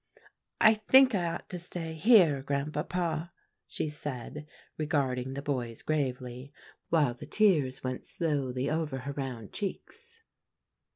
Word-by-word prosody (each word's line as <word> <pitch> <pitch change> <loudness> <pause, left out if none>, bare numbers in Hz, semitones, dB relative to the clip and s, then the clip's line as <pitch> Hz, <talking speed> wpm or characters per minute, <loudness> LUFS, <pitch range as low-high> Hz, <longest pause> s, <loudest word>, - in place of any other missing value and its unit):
"I 220 - +7
think 260 +4 +5
I 180 -4 +1
ought 170 0 -4
to 180 - -4
stay 170 -1 -5
here, 165 - +5
Grandpapa," 155 +4 -2 0.4
she - - -3
said, 150 0 -6 0.3
regarding 135 -4 -1
the 140 - -5
boys 125 -6 -3
gravely, 130 -3 -2 0.4
while 150 -7 +3
the 120 - -11
tears 155 -12 +2
went 130 0 -4
slowly 135 -6 -1
over 155 -4 -1
her 140 +3 -4
round 130 -6 -6
cheeks. 455 - -6
150 Hz, 125 wpm, -30 LUFS, 130-170 Hz, 0.4 s, I